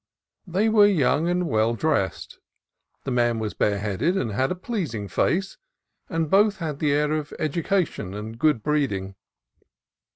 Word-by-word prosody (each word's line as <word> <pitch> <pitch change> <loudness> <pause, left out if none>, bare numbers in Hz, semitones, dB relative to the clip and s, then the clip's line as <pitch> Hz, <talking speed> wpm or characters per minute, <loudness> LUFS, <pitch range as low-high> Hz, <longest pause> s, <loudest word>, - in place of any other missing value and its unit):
They 190 +5 +1
were 215 -2 +6
young 160 -3 +2
and 180 0 0
well 110 -2 +1
dressed. 115 -8 -1 0.6
The 135 - -3
man 120 -1 +2
was 110 -2 -3
bareheaded, 105 - 0
and 120 - -1
had 130 +6 0
a - - -1
pleasing 170 - -4
face, 185 - -1 0.5
and 165 -1 -1
both 200 +4 +3
had 155 -5 -4
the 150 -2 +1
air 150 +1 +1
of 155 -1 -2
education 155 - -1
and 110 +2 -7
good 150 -7 +2
breeding. 125 -11 -1
150 Hz, 150 wpm, -24 LUFS, 110-175 Hz, 0.6 s, were